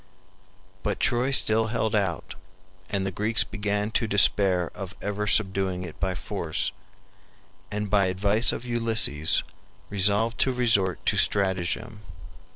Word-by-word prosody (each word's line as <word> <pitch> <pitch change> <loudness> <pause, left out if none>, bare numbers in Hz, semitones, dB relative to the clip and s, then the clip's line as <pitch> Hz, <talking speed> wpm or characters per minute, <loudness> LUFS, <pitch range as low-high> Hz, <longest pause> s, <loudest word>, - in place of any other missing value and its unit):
But - - -2
Troy 120 +2 +2
still 110 -4 +4
held 110 -1 -2
out, 95 -6 -1 0.6
and 100 -1 -2
the 95 - -2
Greeks 110 +4 0
began 105 +1 -3
to 110 - 0
despair 100 -3 +2
of 95 -1 -8
ever 105 +1 -3
subduing 95 -3 +1
it 85 -3 -10
by 95 -1 -1
force, 85 -5 -3 1.0
and 105 0 -3
by 100 -1 +2
advice 100 +5 +2
of 125 - -6
Ulysses 115 -10 +1 0.5
resolved 105 +4 +2
to 130 - +3
resort 110 -8 +1
to - - +2
stratagem. 95 +1 0
100 Hz, 130 wpm, -25 LUFS, 95-110 Hz, 1.0 s, still